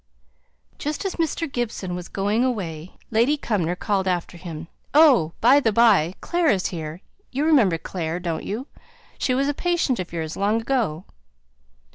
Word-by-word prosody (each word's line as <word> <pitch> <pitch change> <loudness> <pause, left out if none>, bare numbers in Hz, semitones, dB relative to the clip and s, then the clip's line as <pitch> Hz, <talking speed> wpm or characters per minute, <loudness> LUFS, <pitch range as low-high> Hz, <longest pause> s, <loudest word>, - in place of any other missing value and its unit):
Just 300 +6 -3
as 390 - -3
Mr. 330 +1 -1
Gibson 235 -8 -3
was 180 0 -5
going 205 +4 0
away, 180 -9 -3 0.2
Lady 235 +7 +3
Cumnor 185 - -1
called 195 0 -1
after 175 -1 -1
him, 165 -2 -8 0.3
"Oh! 265 - +6
by 260 +5 +6
the 230 -6 +1
by, 200 -6 +4
Clare 345 -2 +1
is 190 -7 +1
here; 160 +1 -6 0.3
you 280 +4 -1
remember 240 - +4
Clare, 165 0 -4
don't 170 -3 -3
you? 225 +6 -4 0.5
She 255 - +1
was 275 +2 +1
a 290 - +1
patient 340 - 0
of 180 - -5
yours, 160 -2 -4
long 210 +3 +1
ago." 225 - -1
205 Hz, 160 wpm, -23 LUFS, 175-265 Hz, 0.5 s, Oh